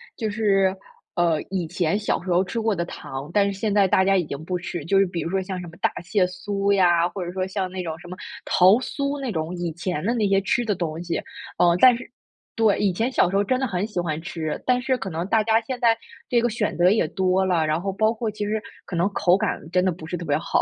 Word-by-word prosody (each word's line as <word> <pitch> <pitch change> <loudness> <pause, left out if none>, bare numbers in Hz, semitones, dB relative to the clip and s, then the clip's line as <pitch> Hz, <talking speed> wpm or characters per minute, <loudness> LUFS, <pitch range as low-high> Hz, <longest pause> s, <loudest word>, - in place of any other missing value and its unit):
就 220 -2 -2
是， 195 -3 +2 0.4
呃， 170 -3 +2
以 180 -4 -2
前 175 +3 0
小 205 - -1
时 185 - -3
候 175 +1 +4
吃 225 +5 -3
过 220 -1 +1
的 170 -2 -2
糖， 135 -2 -7
但 200 -1 +4
是 190 - -7
现 210 -2 0
在 200 -2 +5
大 190 +1 +3
家 195 0 +4
已 180 - +2
经 145 +1 -6
不 180 0 -1
吃， 175 -3 -6
就 195 +3 +2
是 195 - +5
比 175 -2 -4
如 165 - -3
说， 190 +1 0
像 185 -1 -5
什 175 - -7
么 165 - -12
大 - - +3
蟹 185 +1 +1
酥 195 +2 -2
呀， 175 -3 +4
或 185 0 -5
者 175 - -5
说 185 -1 -1
像 190 -1 -3
那 185 0 -5
种 160 -1 -4
什 175 - -12
么 180 - -7 0.3
桃 185 +5 +5
酥 280 +2 -3
那 265 -3 -3
种 160 0 -3
以 170 -2 -3
前 170 -1 -3
的 235 - +2
那 220 -4 +1
些 195 0 +3
吃 240 +5 0
的 215 -3 0
东 165 -2 -3
西。 170 - -2 0.4
嗯， 175 0 +4
但 255 -2 +8
是 245 - -9 0.5
对， 220 -3 +3
以 200 -2 +2
前 225 +8 0
小 180 - +3
时 195 - -3
候 200 - +3
真 255 +5 0
的 265 - 0
很 195 -2 -2
喜 200 -5 -3
欢 160 -2 -2
吃， 160 -2 -4
但 250 -1 +3
是 260 0 0
可 195 -3 -5
能 165 +2 -3
大 220 +1 +3
家 225 +1 +3
现 250 +2 -5
在 230 -2 +4 0.3
这 240 -2 +3
个 240 - +1
选 215 -4 -2
择 180 +2 +5
也 210 -7 +2
多 190 +1 +1
了， 170 -4 +2
然 155 +2 0
后 195 0 -2
包 215 +3 +2
括 225 -1 -3
其 210 0 -4
实 215 +1 -1 0.2
可 180 - -6
能 175 +3 +2
口 180 +1 +3
感 - - -1
真 180 0 +2
的 185 - +3
不 160 -1 -9
是 175 - -4
特 170 - -6
别 145 0 +1
好， 160 - 0
190 Hz, 295 characters per minute, -23 LUFS, 175-215 Hz, 0.5 s, 但